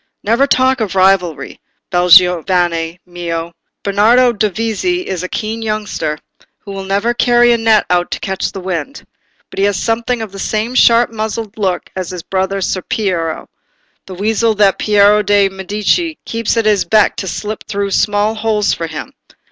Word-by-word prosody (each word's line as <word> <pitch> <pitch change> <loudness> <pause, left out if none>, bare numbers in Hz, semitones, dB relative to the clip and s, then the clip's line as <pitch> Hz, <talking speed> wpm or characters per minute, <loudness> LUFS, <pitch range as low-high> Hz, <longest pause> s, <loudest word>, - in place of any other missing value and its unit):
"Never 235 +6 +2
talk 260 -1 +2
of 200 -3 -2
rivalry, 180 -6 +1 0.3
bel 180 0 +1
giovane 175 -2 +3
mio: 170 -1 -5 0.3
Bernardo 230 +5 +3
Dovizi 225 - -1
is 185 -3 -4
a 185 - -5
keen 220 +1 -4
youngster, 215 -8 -3 0.4
who 200 - -11
will 195 0 -6
never 200 +5 0
carry 240 0 +3
a - - +2
net 220 -2 +3
out 175 0 +1
to - - -4
catch 190 0 -3
the 195 - -7
wind; 185 - -5 0.5
but - - -7
he 195 - +3
has 205 -2 0
something 230 +4 -1
of 215 - -8
the 195 - -9
same 220 +4 -2
sharp 235 -1 +4
muzzled 220 -1 -4
look 190 -4 -2
as 185 -2 -4
his 180 -2 -7
brother 190 +1 -2
Ser 185 0 -1
Piero, 175 -6 -2 0.6
the 190 - -8
weasel 220 +3 0
that 200 -2 +3
Piero 210 0 +4
de' 205 -1 +2
Medici 210 - -1
keeps 230 0 -2
at 225 - +1
his 210 -2 +3
beck 215 -1 +2
to 190 - -4
slip 210 +3 -5
through 200 -2 -2
small 205 +2 +1
holes 215 -2 0
for 165 - -4
him. 155 -3 -8
205 Hz, 170 wpm, -15 LUFS, 185-225 Hz, 0.6 s, sharp